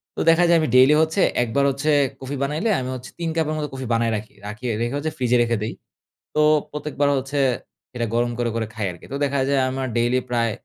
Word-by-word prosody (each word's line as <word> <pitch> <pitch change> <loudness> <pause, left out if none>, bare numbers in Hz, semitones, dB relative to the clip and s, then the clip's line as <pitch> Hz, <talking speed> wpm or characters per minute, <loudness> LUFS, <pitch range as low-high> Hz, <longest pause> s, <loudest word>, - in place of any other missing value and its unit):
তো - - -6
দেখা 165 +2 +5
যায় 170 - +6
আমি 155 - 0
ডেইলি 130 +3 +7
হচ্ছে 160 +4 +1 0.2
একবার 120 +4 0
হচ্ছে 140 +3 -2 0.3
কফি 135 +2 -5
বানাইলে 150 +10 -1
আমি 130 0 -4
হচ্ছে 125 0 -9
৩ 170 -1 -2
কাপের 160 -2 0
মতো 150 -1 -2
কফি 130 -1 -5
বানায় 115 0 +1
রাখি 110 0 -6
রাখি 110 +4 -8 0.2
রেখে 120 +3 -1
হচ্ছে 155 +2 -2
ফ্রিজে 125 -1 +2
রেখে 115 -1 0
দেই। 110 - -3 0.6
তো 150 - +3 0.3
প্রত্যেকবার 145 -1 -1
হচ্ছে 135 +2 -5 0.6
এটা 120 -1 -1
গরম 120 +1 +1
করে, 120 -1 0
করে 115 -1 -1
খাই 110 -1 -3
আরকি। 85 - -13
তো - - -3
দেখা 140 0 0
যায় 140 -1 +3
আমার 130 0 -3
ডেইলি 120 +2 +2
প্রায় 115 -2 +1
130 Hz, 220 wpm, -22 LUFS, 120-150 Hz, 0.6 s, ডেইলি